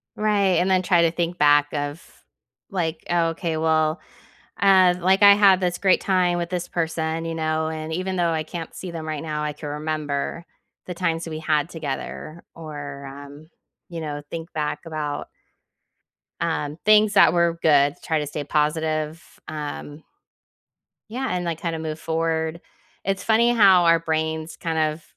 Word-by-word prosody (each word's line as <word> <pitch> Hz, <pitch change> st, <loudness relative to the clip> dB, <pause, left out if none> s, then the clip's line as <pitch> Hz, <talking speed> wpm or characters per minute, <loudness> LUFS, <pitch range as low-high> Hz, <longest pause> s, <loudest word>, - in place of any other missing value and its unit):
Right, 200 Hz, -4 st, +2 dB
and 185 Hz, +2 st, +2 dB
then 185 Hz, -1 st, +3 dB
try 175 Hz, -2 st, +3 dB
to 165 Hz, -, +3 dB
think 175 Hz, 0 st, -2 dB
back 145 Hz, 0 st, +4 dB
of, 145 Hz, +2 st, -3 dB, 0.7 s
like, 165 Hz, -5 st, -3 dB
oh, 170 Hz, -1 st, +2 dB
okay, 165 Hz, -1 st, -3 dB
well, 155 Hz, 0 st, +1 dB, 0.6 s
uh, 185 Hz, -2 st, +6 dB
like, 190 Hz, +3 st, +3 dB
I 200 Hz, 0 st, +9 dB
had 195 Hz, -2 st, +5 dB
this 180 Hz, -1 st, -1 dB
great 190 Hz, -2 st, +3 dB
time 180 Hz, -2 st, +1 dB
with 170 Hz, 0 st, -3 dB
this 180 Hz, -1 st, -2 dB
person, 160 Hz, -1 st, -2 dB
you 165 Hz, 0 st, -3 dB
know, 155 Hz, 0 st, -1 dB
and 160 Hz, 0 st, -5 dB
even 185 Hz, +2 st, -2 dB
though 170 Hz, -1 st, +2 dB
I 160 Hz, -1 st, -1 dB
can't 165 Hz, 0 st, -7 dB
see 185 Hz, -, -7 dB
them 160 Hz, -2 st, -6 dB
right 155 Hz, -2 st, -4 dB
now, 150 Hz, -1 st, -3 dB
I 150 Hz, 0 st, -2 dB
can 150 Hz, 0 st, -8 dB
remember 150 Hz, +1 st, -3 dB, 0.4 s
the 180 Hz, -, -5 dB
times 170 Hz, -2 st, -1 dB
that 165 Hz, -, -7 dB
we 155 Hz, -, -5 dB
had 155 Hz, 0 st, 0 dB
together 155 Hz, +1 st, -6 dB
or, 145 Hz, -3 st, -8 dB
um, 145 Hz, +3 st, -11 dB, 0.4 s
you 170 Hz, -1 st, -6 dB
know, 145 Hz, -2 st, -5 dB
think 165 Hz, +1 st, -7 dB
back 150 Hz, -1 st, -2 dB
about 150 Hz, -2 st, -4 dB, 1.1 s
um, 145 Hz, +2 st, -2 dB
things 215 Hz, 0 st, +5 dB
that 195 Hz, -, +6 dB
were 170 Hz, -1 st, +1 dB
good, 145 Hz, -2 st, +4 dB
try 160 Hz, -3 st, 0 dB
to 150 Hz, -, -3 dB
stay 145 Hz, 0 st, -4 dB
positive, 155 Hz, +1 st, -1 dB, 0.3 s
um 150 Hz, 0 st, -6 dB, 1.1 s
Yeah, 260 Hz, +3 st, -3 dB
and, 180 Hz, -1 st, -1 dB
like, 165 Hz, -2 st, -3 dB
kinda 165 Hz, -2 st, -3 dB
move 155 Hz, -1 st, -5 dB
forward. 160 Hz, 0 st, -2 dB, 0.4 s
It's 195 Hz, 0 st, -2 dB
funny 230 Hz, +2 st, +3 dB
how 195 Hz, -6 st, +6 dB
our 165 Hz, 0 st, +5 dB
brains 160 Hz, 0 st, -2 dB
kind 165 Hz, -2 st, -3 dB
of 155 Hz, 0 st, 0 dB
160 Hz, 170 wpm, -23 LUFS, 155-175 Hz, 1.1 s, I